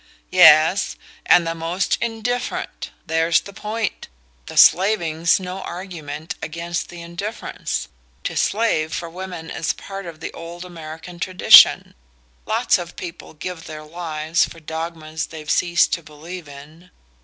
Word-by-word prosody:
"Yes; 160 +1 +6 0.3
and 175 -1 +6
the 165 - -1
most 165 +3 -1
indifferent: 235 +2 -3 0.2
there's 165 +1 +3
the 200 - -11
point. 215 +2 -4 0.4
The - - -8
'slaving's' 175 -4 +4
no 185 +1 -6
argument 165 -5 -6
against 170 +2 -4
the 175 -1 -9
indifference 195 +7 -4 0.4
To - - -3
slave 200 -8 +1
for 170 -1 -5
women 180 -2 -7
is 160 - -1
part 195 -2 -8
of 165 -2 -9
the 165 - -6
old 170 +2 -8
American 165 0 -9
tradition; 185 +1 +7 0.5
lots 225 -2 +2
of 175 -1 -8
people 170 -2 -9
give 165 +2 -6
their 155 -1 -8
lives 160 0 -1
for 165 - -5
dogmas 160 0 -5
they've 155 -2 -10
ceased 175 -1 +3
to 170 - -1
believe 160 +2 -10
in. 150 +5 -13
170 Hz, 135 wpm, -21 LUFS, 160-185 Hz, 0.5 s, tradition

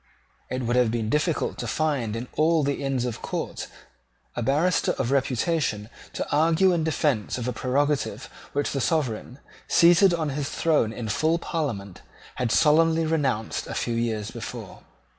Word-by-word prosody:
It 130 0 -3
would 120 +1 0
have 125 -2 +4
been 115 -1 -2
difficult 150 +2 0
to 120 - -3
find 125 -3 -1
in 120 +2 -5
all 160 0 +3
the 140 0 -1
Inns 135 -3 0
of 120 -3 -4
Court - - -4 0.7
a - - -2
barrister 150 +9 +2
of 120 - -2
reputation 130 -4 0 0.2
to - - -3
argue 165 +5 +4
in 165 -2 0
defence 145 -9 0
of 125 -1 -4
a 125 - -1
prerogative 140 +4 -1 0.3
which 145 0 0
the 135 - -1
Sovereign, 130 -6 -1 0.3
seated 175 +3 +6
on 165 -3 -1
his 140 0 -3
throne 150 -9 +1
in 115 0 -5
full 155 +10 +1
Parliament, 120 - -4 0.4
had 125 -3 0
solemnly 160 +3 +4
renounced 135 -9 -1
a - - -5
few 120 - -1
years 115 -3 -2
before. - - -8
140 Hz, 160 wpm, -25 LUFS, 120-160 Hz, 0.7 s, seated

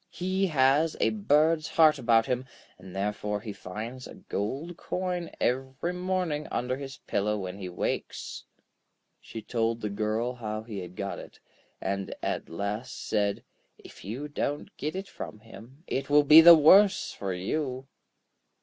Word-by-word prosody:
He 190 +2 -1
has 150 +1 +3
a - - +3
bird's 160 -6 +2
heart 155 -2 +4
about 115 -1 +4
him, 125 +1 -2 0.3
and 95 -1 -12
therefore 105 +1 -2
he 105 0 -7
finds 115 +8 -7
a - - -11
gold 135 - -4
coin 180 -1 -3
every 130 +7 -1
morning 180 -4 -2
under 125 +1 -1
his 135 0 -8
pillow 105 +1 0
when 95 0 -6
he 95 -2 -5
wakes.' 90 - -4 0.8
She 110 - -9
told 115 0 -1
the 105 -2 -3
girl 110 +4 -1
how 110 -3 -5
he 110 -3 -6
had 90 -1 -8
got 100 +1 -4
it, - - -12 0.4
and 95 0 -3
at - - -2
last 100 +8 -4
said: 100 -2 0 0.3
'If - - -14
you 120 +10 -5
don't 145 0 -3
get 155 +4 -4
it 195 +1 -4
from 105 - -8
him, 120 +6 -14
it 135 +1 -3
will 145 0 +6
be 155 +3 +10
the 170 +1 +11
worse 190 +6 +6
for 100 -1 -4
you.' 130 +7 -3
125 Hz, 160 wpm, -28 LUFS, 105-155 Hz, 0.8 s, the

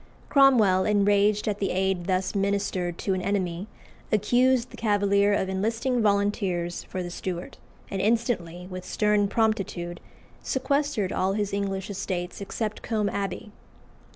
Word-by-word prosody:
Cromwell, 235 -10 +5
enraged 205 0 +3
at 205 -1 -1
the 195 - 0
aid 190 -1 0
thus 185 0 0
ministered 195 -3 -1
to 195 - -1
an 185 - -1
enemy, 185 -1 -2 0.4
accused 245 +4 +3
the - - -9
Cavalier 205 -2 +2
of 200 -2 +1
enlisting 225 +6 0
volunteers 200 -4 0
for 185 - -4
the 175 - -6
Stuart, 175 0 -5 0.3
and 195 - -1
instantly, 205 -6 0
with 185 -1 -7
stern 210 +2 +2
promptitude, 195 -6 -1 0.4
sequestered 265 -6 0
all 190 +1 +1
his 205 -1 -2
English 195 -1 -2
estates 180 -1 -4
except 215 +2 -4
Combe 215 -3 0
Abbey. 200 +1 -4
200 Hz, 135 wpm, -26 LUFS, 185-215 Hz, 0.4 s, Cromwell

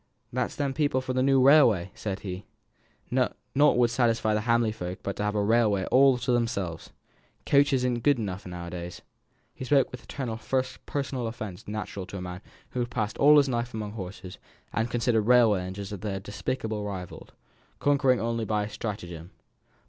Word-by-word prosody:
"Them's - - -1
the 140 -2 -1
people 145 -3 +1
for 130 0 -3
the 130 - +1
new 135 0 +4
railway," 125 - +5
said 100 -2 -5
he. 95 0 -6 0.7
"Nought 125 0 +1 0.2
would 125 -4 +4
satisfy 115 -3 +2
the 105 - +1
Hamley 115 0 +2
folk 90 -3 -5
but 100 - -3
to - - -2
have 105 0 -1
a 105 - +1
railway 105 -3 +2
all 135 -1 +6
to 125 - -1
themselves 105 -9 -1 0.6
coaches 140 -2 +3
isn't 125 -1 0
good 140 +3 +3
enough 95 -4 -4
now 90 -1 -6
a 85 - -8
days." 90 0 -7 0.5
He - - -8
spoke 135 0 +3
with 125 - -8
a - - -21
tone 135 -4 -4
of 130 +3 -2
personal 135 -4 -2
offence 110 -5 -7
natural 100 -3 -5
to 100 - -7
a - - -6
man 90 +1 -6 0.3
who 125 - -3
had 120 0 -1
passed 110 -3 -3
all 150 +2 +7
his 140 -1 +5
life 120 -2 -2
among 105 -2 -4
horses, 95 -2 -8 0.3
and 115 +1 0
considered 115 -1 +1
railway 115 -3 +4
engines 95 +3 -6
as 100 - -6
their 100 -1 -3
despicable 105 +2 -4
rivals, 95 -3 -7 0.5
conquering 135 -3 +3
only 115 0 -1
by 105 -1 0
stratagem. 90 -6 -6
115 Hz, 185 wpm, -27 LUFS, 100-125 Hz, 0.7 s, all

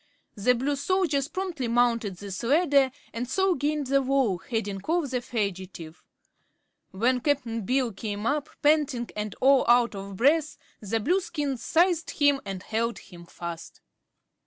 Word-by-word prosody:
The 250 +4 +2
Blue 275 +4 -1
soldiers 285 -2 0
promptly 350 -8 -3
mounted 230 -4 +1
this 195 -1 -6
ladder 280 +1 +3 0.2
and 240 +2 -4
so 380 +5 +2
gained 295 -1 -1
the 275 +1 +2
wall, 260 -8 +1
heading 205 -1 -3
off 325 -4 0
the 250 -1 -1
fugitive. 190 -8 -5 0.9
When 245 +6 +1
Cap'n 240 -6 -1
Bill 255 -2 +1
came 205 +1 -5
up, 290 +4 0
panting 290 -5 +2
and 210 -2 -4
all 270 0 +5
out 240 -1 +4
of 195 0 -7
breath, 305 +6 +2 0.2
the 225 +2 -2
Blueskins 295 - -1
seized 335 0 +2
him 285 -2 +4
and 195 -1 -5
held 230 +1 -1
him 170 -2 -13
fast. 170 -1 -8
250 Hz, 145 wpm, -26 LUFS, 210-290 Hz, 0.9 s, all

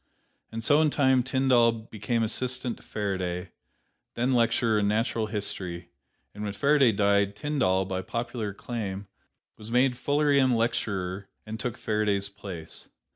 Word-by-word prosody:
And 115 0 -5
so 145 +6 +4
in 155 - +4
time 130 -3 +3
Tyndall 125 -2 +3
became 115 0 -3
assistant 125 +2 -1
to - - -17
Faraday, 95 -3 -3 0.6
then 125 +3 +1
lecturer 115 -2 +2
in 100 - +1
natural 110 +1 0
history; 90 -5 -4 0.4
and 105 - -7
when 105 -1 -3
Faraday 140 +1 +4
died, 100 -1 +2
Tyndall, 95 -9 +1
by 95 -1 -3
popular 115 0 -3
acclaim, 100 -1 -5 0.5
was 110 +1 -11
made 125 +2 +3
Fullerian 140 -2 +2
Lecturer 100 -4 -2 0.2
and 110 +1 -6
took 125 -3 -3
Faraday's 105 -2 0
place. 95 -5 -9
110 Hz, 135 wpm, -27 LUFS, 100-125 Hz, 0.6 s, so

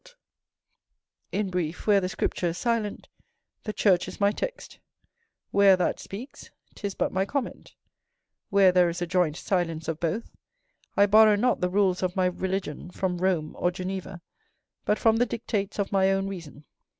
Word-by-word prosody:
In 205 -2 -1
brief, 175 -2 -3
where 205 -2 +4
the 185 - -2
Scripture 185 -3 -1
is 170 +1 -3
silent, 230 -4 -2 0.6
the 215 - -2
church 190 -4 +2
is - - -9
my 200 0 +4
text; - - -6 0.7
where 200 -1 +6
that 180 - 0
speaks, 240 +8 -9 0.2
'tis 200 -2 -5
but - - 0
my 190 +1 +2
comment; 260 +5 -4 0.7
where 195 -2 +5
there 180 -1 +4
is 170 +1 -4
a - - 0
joint 175 -3 +1
silence 165 -4 -2
of 160 -1 -3
both, 175 +7 -3 0.6
I 200 - +7
borrow 215 +1 +6
not 245 +4 +1
the 180 - +1
rules 190 -1 +2
of 185 -1 -1
my 185 -1 +2
religion 180 -3 -3
from 180 -1 -2
Rome 175 -4 0
or 175 - +2
Geneva, 185 0 -5 0.6
but 210 - +2
from 225 -1 +3
the 245 - +3
dictates 210 -4 -3
of 200 -1 -1
my 190 -1 +3
own 195 0 0
reason. 165 -6 -9
190 Hz, 165 wpm, -26 LUFS, 180-205 Hz, 0.7 s, I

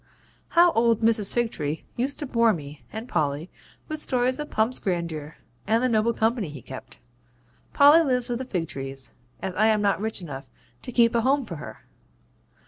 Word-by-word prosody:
How 345 0 +7
old 230 -3 +2
Mrs. 220 -3 +3
Figtree 165 -11 -1
used 265 +4 -1
to 295 - -4
bore 230 -4 +3
me 145 -4 -8
and 220 +2 -6
Polly 155 - -1 0.4
with 310 -1 -4
stories 255 -1 +1
of 295 - -4
Pump's 225 +4 +1
grandeur 170 -5 -3 0.3
and 225 +3 +2
the - - +4
noble 225 -1 +2
company 225 -4 0
he 145 -3 -10
kept! 130 - -10 0.8
Polly 290 +4 +7
lives 250 -4 +1
with 240 -1 -2
the 260 - -4
Figtrees, 135 - -3 0.3
as 190 -1 -2
I 215 +4 +3
am 215 -1 +2
not 200 -1 +1
rich 220 -1 -2
enough 140 -6 -8 0.3
to - - -7
keep 235 -1 +4
a 235 - +2
home 270 +2 +2
for 170 -7 -7
her. 150 - -10
220 Hz, 180 wpm, -25 LUFS, 165-245 Hz, 0.8 s, How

